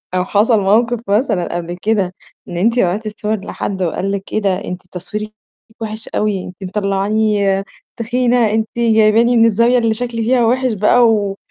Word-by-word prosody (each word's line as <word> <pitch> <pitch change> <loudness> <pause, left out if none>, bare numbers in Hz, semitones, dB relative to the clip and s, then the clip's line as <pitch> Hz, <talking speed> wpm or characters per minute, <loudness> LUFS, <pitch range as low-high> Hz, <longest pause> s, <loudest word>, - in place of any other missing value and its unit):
أو 180 0 +1
حصل 215 +3 +2
مَوقف 230 +4 +2
مثلًا 200 -5 0
قبل 175 0 -5
كده، 200 -4 0 0.3
إن 175 - -6
أنتِ 230 +7 +1
بعتتِ 200 +1 0
الصور 210 -1 -3
لحد، 190 -2 -4
وقال 185 +3 -1
لِك 200 -1 -5
إيه 215 - +1
ده؟ 195 -1 -1
أنتِ 180 0 -6
تصويرك 210 +4 -6 0.5
وِحش 220 0 -6
أوي، 205 -3 -1
أنتِ 180 - -10
مطلعاني 200 0 0 0.3
تخينة، 240 0 +1
أنتِ 220 0 0
جايباني 225 +1 +3
من 225 - +5
الزاوية 235 +3 +3
اللي 230 -2 +1
شكلي 235 0 -3
فيها 240 +1 +2
وِحش 255 +1 +1
بقى. 220 +4 +4
و 205 -3 0
215 Hz, 165 wpm, -17 LUFS, 195-230 Hz, 0.5 s, من